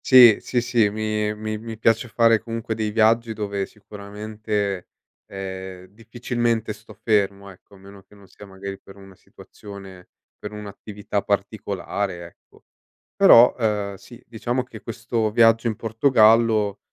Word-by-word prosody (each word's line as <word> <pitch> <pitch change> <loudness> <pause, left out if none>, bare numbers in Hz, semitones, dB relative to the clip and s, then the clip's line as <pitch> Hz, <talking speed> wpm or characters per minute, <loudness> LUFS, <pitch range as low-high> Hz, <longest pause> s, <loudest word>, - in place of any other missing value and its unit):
Sì, 125 -5 +8
sì, 125 - -1
sì, 120 -3 +2
mi 105 0 -2
mi 110 0 -5
mi 115 0 -8
piace 115 +2 +1
fare 115 -1 +3
comunque 115 -1 -5
dei 110 -1 -2
viaggi 115 +1 +2
dove 100 -2 -3
sicuramente, 105 -1 -5 0.4
ehm, 95 -1 -7
difficilmente 115 +2 -3
sto 110 0 -16
fermo, 100 -2 -1
ecco, 95 +2 -19
a - - -16
meno 100 +1 -15
che 100 +2 -22
non 100 -1 -18
sia 100 +2 -14
magari 95 0 -8
per 95 - -16
una 95 -1 -15
situazione, 95 -1 -13 0.3
per 105 - -8
un'attività 105 0 -5
particolare 100 -2 -3
ecco. 85 - -19 0.5
Però, 125 -11 +7
uhm, 105 -3 -1
sì, 115 +5 -15
diciamo 120 +2 -3
che 115 -3 -12
questo 115 -1 -2
viaggio 115 +1 +4
in 110 - -1
Portogallo, 110 -2 +3
105 Hz, 140 wpm, -22 LUFS, 100-115 Hz, 0.5 s, Sì